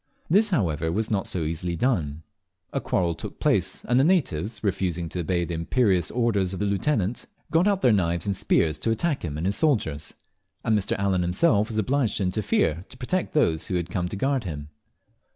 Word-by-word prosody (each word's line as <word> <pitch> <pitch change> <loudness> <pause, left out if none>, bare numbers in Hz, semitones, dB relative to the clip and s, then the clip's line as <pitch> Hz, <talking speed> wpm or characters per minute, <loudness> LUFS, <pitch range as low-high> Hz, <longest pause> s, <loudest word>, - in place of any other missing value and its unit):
This, 210 +5 +5
however, 80 - 0
was 110 +5 -1
not 100 -2 0
so 90 - -2
easily 85 +2 -3
done. 80 - -1 0.5
A - - -1
quarrel 85 -2 0
took 85 - -9
place, - - 0
and 125 +2 +3
the - - +5
natives, 115 - 0
refusing 90 -4 -1
to 90 - -5
obey 85 0 0
the 85 - -5
imperious 90 +1 +1
orders 105 -6 0
of - - -6
the 105 - 0
lieutenant, 100 +1 0 0.2
got 170 +4 +3
out 200 -2 +2
their 125 - +5
knives 85 -4 +1
and 100 -1 0
spears 80 -4 +1
to 115 - -1
attack 140 +7 0
him 75 -4 -4
and 80 - -3
his 100 +2 0
soldiers; 90 - 0 0.5
and 110 -2 +2
Mr. 100 -1 0
Allen 95 -2 +1
himself 100 - +2
was 110 -2 -5
obliged 125 +2 +1
to - - 0
interfere 90 -4 0
to - - -12
protect 170 +9 -2
those 85 - +2
who 95 - -2
had 85 -1 -2
come 90 -3 -1
to - - -5
guard 135 +4 0
him. 75 -5 -6
95 Hz, 205 wpm, -25 LUFS, 85-120 Hz, 0.5 s, This